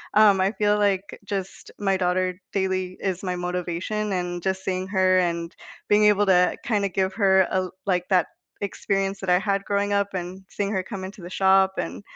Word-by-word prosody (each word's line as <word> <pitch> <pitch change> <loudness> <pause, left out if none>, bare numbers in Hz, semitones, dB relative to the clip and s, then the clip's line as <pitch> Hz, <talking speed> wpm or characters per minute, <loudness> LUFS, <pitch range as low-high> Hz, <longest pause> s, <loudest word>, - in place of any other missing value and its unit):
Um, 210 -2 +6
I 190 +1 +2
feel, 210 0 +2
like, 200 -1 0
just, 195 -2 -5
my 195 -2 +1
daughter, 185 0 0
daily, 185 -1 -1
is 190 -2 -2
my 180 -1 -2
motivation 180 +4 -3
and 175 -1 -3
just 190 +1 -2
seeing 185 0 -2
her 185 -1 +3
and 170 -1 -2 0.3
being 210 0 +5
able 205 0 +4
to 180 -1 +4
kinda 205 -4 0
give 190 +1 -1
her, 190 -3 +4
uh, - - +1
l 180 - -9
like 180 -2 0
that 180 -3 +3 0.3
experience 195 -1 -2
that 190 - -4
I 180 - +5
had 200 -1 -1
growing 205 0 0
up 200 0 +2
and 185 +1 -5
seeing 200 -1 -2
her 190 -3 0
come 195 -2 -7
into 190 +1 -8
the 175 - -8
shop 190 0 +3
and, 85 +4 -4
190 Hz, 195 wpm, -24 LUFS, 180-200 Hz, 0.3 s, Um